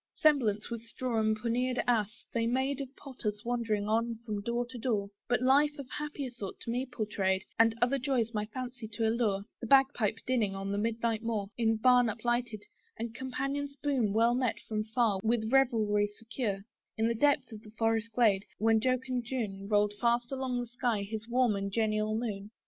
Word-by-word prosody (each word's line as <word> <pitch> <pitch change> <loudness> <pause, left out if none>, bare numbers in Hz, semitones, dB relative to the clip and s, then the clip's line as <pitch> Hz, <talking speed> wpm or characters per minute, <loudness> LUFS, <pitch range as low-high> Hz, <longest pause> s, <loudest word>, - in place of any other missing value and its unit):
Semblance, 240 -9 +2
with 230 -1 -3
straw 235 0 -2
and 215 0 +2
pauniered 245 +3 0
ass, 230 -1 0
they 230 -1 +1
made 265 +3 0
Of 270 - -5
potters 225 -6 -5
wandering 225 -4 0
on 230 +1 +1
from 210 -3 -3
door 235 +3 -1
to 250 - -7
door: 210 -4 -1 0.2
But 245 +1 +1
life 290 +3 +4
of 280 -3 -7
happier 295 -3 -4
sort 210 -6 -7
to 230 - -3
me 250 +3 -1
pourtrayed, 200 -5 -1 0.2
And 225 0 +5
other 270 +3 +2
joys 245 -3 0
my 210 -1 -1
fancy 245 0 -6
to 225 +1 +1
allure; 220 -4 +1 0.2
The 235 - -5
bag 270 +1 +6
pipe 215 -4 0
dinning 225 -6 +1
on 195 0 -3
the 200 - 0
midnight 230 0 0
moor 215 -3 -2
In 225 -2 +2
barn 245 +2 +5
uplighted, 235 0 -1 0.3
and 230 0 -4
companions 275 +3 -3
boon 270 -7 0
Well 230 +3 +4
met 250 -2 0
from 215 -1 -1
far 220 -3 +1
with 220 0 +1
revelry 220 -6 +3
secure, 210 -1 -4 0.4
In 225 +1 +1
depth 285 -4 +3
of 215 -1 -9 0.2
forest 225 0 +1
glade, 215 -5 +3
when 225 0 +4
jocund 255 0 0
June 210 -6 -3
Rolled 205 0 +3
fast 240 +1 +2
along 260 -2 -1
the - - -3
sky 235 -3 -1
his 220 +2 -5
warm 245 -2 +2
and 200 0 -3
genial 215 0 +1
moon. 210 -3 -4
230 Hz, 185 wpm, -31 LUFS, 215-250 Hz, 0.4 s, bag